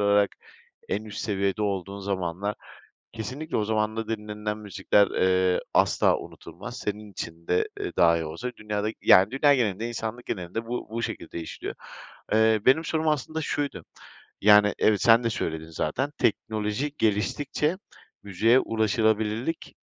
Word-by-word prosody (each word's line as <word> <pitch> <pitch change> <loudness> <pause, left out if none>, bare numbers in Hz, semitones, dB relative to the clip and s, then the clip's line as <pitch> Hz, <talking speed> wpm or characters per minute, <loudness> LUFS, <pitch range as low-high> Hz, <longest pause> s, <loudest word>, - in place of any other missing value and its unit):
olarak 100 -1 +3 0.6
en 105 - -1
üst 105 -1 -8
seviyede 100 0 -1
olduğun 100 -1 -2
zamanlar. 95 0 -2 0.6
Kesinlikle 130 +8 -5
o 105 - +1
zamanda 110 +1 -1
dinlenilen 105 -1 -4
müzikler, 100 -1 +2
eee, 95 0 +2
asla - - +3
unutulmaz. - - -9
Senin 105 0 -5
için 85 -3 -8
de, 90 - +1
eee, - - -3
dahi 85 -1 +4
olsa 85 +11 -5
dünyada 105 0 -2
yani 95 +3 +6
dünya 140 +2 +4
genelinde, 115 -3 0
insanlık 120 +1 -5
genelinde 95 +4 -4
bu 120 +1 -4
bu 115 +1 -3
şekilde 85 - -5
işliyor. 80 - -6 0.6
Eee, 110 0 +4
benim 160 +5 +5
sorum 160 0 0
aslında 155 +2 -1
şuydu, 140 - -3 0.6
yani 105 0 +6
evet 105 -2 +3
sen 115 -1 +6
de 115 - +1
söyledin 80 -6 -3
zaten. 105 - -2
Teknoloji 110 +6 -1
geliştikçe 135 - 0 0.5
müziğe 110 +6 +3
ulaşılabilirlik 110 +5 0
105 Hz, 135 wpm, -26 LUFS, 100-115 Hz, 0.6 s, yani